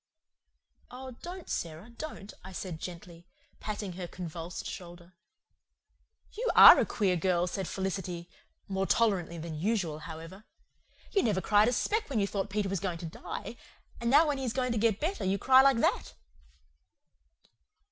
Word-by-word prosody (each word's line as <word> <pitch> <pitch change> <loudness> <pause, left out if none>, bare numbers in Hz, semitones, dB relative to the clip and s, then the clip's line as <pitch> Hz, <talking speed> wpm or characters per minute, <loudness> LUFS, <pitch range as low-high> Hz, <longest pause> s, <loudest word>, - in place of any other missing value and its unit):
"Oh, 260 +1 -8
don't, 360 +1 -8
Sara, 170 +7 -5
don't," 235 -5 -8
I 190 +1 -10
said 175 -3 -5
gently, 170 0 -9 0.3
patting 205 -3 -5
her 180 0 -6
convulsed 170 0 -7
shoulder. 175 -1 -9 1.2
"You 485 +3 -2
ARE - - +11
a - - +1
queer 195 -5 +1
girl," 175 0 +1
said 185 0 -4
Felicity 185 -3 -4 0.4
more 195 0 -1
tolerantly 190 -7 +1
than 165 0 -6
usual 180 -5 -1
however 165 +5 -9 0.7
"you 400 - +3
never 210 - +1
cried 205 +3 +4
a - - +3
speck 430 - -1
when 255 -6 0
you 200 - +2
thought 200 0 -3
Peter 205 0 -1
was 195 -1 -2
going 180 -2 -3
to 170 - -8
die 165 +7 -7 0.4
and 235 - -1
now 295 +5 +6
when 290 -2 -1
he - - -4
is 240 -3 -2
going 255 -2 -1
to 230 - 0
get 220 -2 +2
better 365 +6 -2
you 190 +1 +1
cry 260 +5 +6
like 270 -2 +4
that." 230 - 0
195 Hz, 165 wpm, -30 LUFS, 175-235 Hz, 1.2 s, ARE